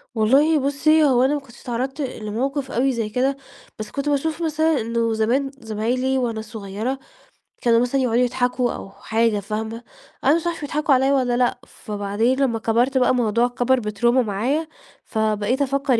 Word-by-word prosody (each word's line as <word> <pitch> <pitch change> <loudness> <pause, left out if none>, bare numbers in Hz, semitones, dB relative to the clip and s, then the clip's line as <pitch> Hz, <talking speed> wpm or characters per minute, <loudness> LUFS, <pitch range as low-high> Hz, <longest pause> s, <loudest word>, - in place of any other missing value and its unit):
والله 280 +8 +4
بُصّي، 305 +3 +3
هو 255 -3 +4
أنا 275 +3 +3
ما 295 - 0
كنتش 240 -4 -17
اتعرّضت 260 +4 -3
لموقف 260 +3 -3
أوي 265 +3 +2
زي 225 -3 -2
كده، 265 +4 0 0.4
بس 215 - -6
كنت 280 +1 -2
باشوف 310 +3 -1
مثلًا 315 -3 +1
إنه 230 0 0
زمان 250 +5 0
زمايلي 240 +4 -1
وأنا 230 -3 -1
صغيرة 220 +4 -5 0.6
كانوا 230 -1 +4
مثلًا 250 +2 +1
يقعدوا 245 -1 +2
يضحكوا 245 0 0
أو - - -8
حاجة 220 +1 0
فاهمة، 220 +3 -5 0.4
أنا 280 +3 +5
مش 335 +1 -2
عارفة 340 -2 -3
بيضحكوا 295 0 +1
عليّا 265 +2 +3
والّا 250 -3 +1
لأ، 245 0 +1
فبعدين 210 +5 -2
لمّا 235 -5 +1
كبرْت 240 +4 +1
بقى 250 - +3
الموضوع 240 -1 +2
كبْر 245 +1 +1
بtrauma 210 +2 -4 0.2
معايا، 250 +11 -1 0.4
فبقيت 220 +4 0
أفكّر 275 -3 +1
245 Hz, 165 wpm, -22 LUFS, 225-275 Hz, 0.6 s, أنا